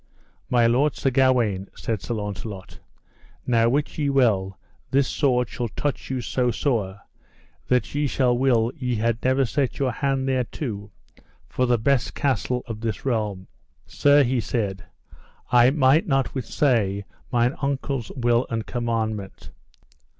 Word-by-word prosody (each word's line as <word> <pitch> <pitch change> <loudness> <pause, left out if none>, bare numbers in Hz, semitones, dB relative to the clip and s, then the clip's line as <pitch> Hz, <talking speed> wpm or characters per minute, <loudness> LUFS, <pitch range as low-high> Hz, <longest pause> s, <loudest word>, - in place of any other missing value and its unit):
My 120 -2 +3
lord 130 +6 +2
Sir 135 - 0
Gawaine, 120 -7 +2
said 110 -4 -3
Sir 120 - -3
Launcelot, 105 -2 -6 0.7
now 115 -2 +3
wit 145 +4 -1
ye 145 -2 +1
well 105 -9 +2 0.3
this 135 0 +2
sword 125 -4 +1
shall 120 +3 -4
touch 140 +6 -4
you 130 -1 -2
so 125 +1 0
sore 105 -6 -1 0.7
that 125 -4 +1
ye 145 0 0
shall 125 -2 +2
will 120 -2 +2
ye 125 -5 -2
had 115 +1 -1
never 130 +1 +3
set 135 +1 -1
your 135 -3 0
hand 135 +1 -1
thereto 125 -5 -3 0.6
for 125 +7 0
the 120 0 +3
best 125 +2 +1
castle 125 -2 0
of 110 -2 -7
this 115 0 -4
realm. 105 -7 -1 0.4
Sir, 145 - +4
he 125 0 0
said, 105 -5 -2 0.7
I 125 0 +6
might 145 +5 +3
not 135 -7 +1
withsay 115 -6 0 0.3
mine 120 +1 +2
uncle's 140 -3 -2
will 120 -1 +1
and 115 -1 -3
commandment. 110 -4 -3
120 Hz, 145 wpm, -24 LUFS, 110-135 Hz, 0.7 s, I